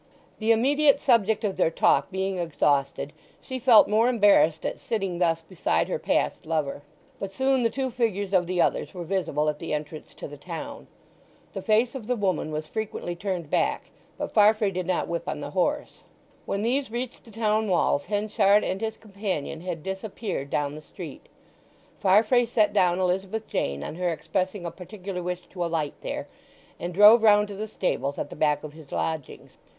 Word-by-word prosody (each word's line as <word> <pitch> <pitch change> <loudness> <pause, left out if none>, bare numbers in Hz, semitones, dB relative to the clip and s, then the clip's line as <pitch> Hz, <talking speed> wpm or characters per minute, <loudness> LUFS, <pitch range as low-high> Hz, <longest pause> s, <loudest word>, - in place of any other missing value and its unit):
The 220 +1 +2
immediate 280 +5 +4
subject 220 -5 +2
of 195 -3 -1
their 180 - +3
talk 165 - +2
being 190 0 -2
exhausted 145 -3 0 0.3
she 260 0 -6
felt 235 -3 +7
more 220 +4 +3
embarrassed 195 -9 +4
at - - -3
sitting 195 -6 -2
thus 165 -2 +2
beside 170 +1 0
her - - -1
past - - -1
lover; 150 -3 -1 0.4
but 195 -1 -4
soon 265 +4 +1
the 230 - +2
two 265 +1 -2
figures 205 -5 -1
of 180 -2 +3
the 180 0 -1
others 175 - +1
were 175 - -5
visible 160 -4 -1
at 150 -1 -1
the 165 -2 -2
entrance 150 +1 -7
to - - -7
the 145 0 -10
town. 180 - -7 0.7
The - - -4
face 225 +3 +2
of 250 -6 -7
the 250 - +1
woman 185 -7 -1
was 155 0 -3
frequently 190 -1 -4
turned 175 -4 -4
back, - - 0 0.3
but - - -4
Farfrae 210 -1 +4
did 185 -1 -3
not 185 - 0
whip 170 0 -3
on 155 - -3
the 145 0 -6
horse. 240 - -1 0.5
When 200 +1 -1
these 260 +3 0
reached 240 +2 -5
the - - -16
town 215 0 0
walls 175 -6 +2
Henchard 205 0 +3
and 190 - -2
his 220 -1 -3
companion 195 -7 -4
had 175 -3 -5
disappeared 190 -5 -4
down 145 0 -1
the 155 - -8
street; - - -10 0.7
Farfrae 220 +5 +4
set 215 -3 +2
down 180 -4 +3
Elizabeth 190 +4 -1
Jane 70 0 -2
on - - -5
her 180 -1 0
expressing 185 +3 -2
a 170 - -3
particular 185 0 -7
wish 180 0 -4
to 180 -2 -3
alight 165 -3 -1
there, - - -4 0.5
and 175 - -4
drove 210 +5 +8
round 210 -1 +5
to 200 - -6
the 215 +2 -4
stables 140 -9 -2
at - - -4
the - - -7
back 150 -1 +1
of 150 -1 -8
his 155 -3 -14
lodgings. 160 -4 -4
190 Hz, 185 wpm, -26 LUFS, 165-220 Hz, 0.7 s, drove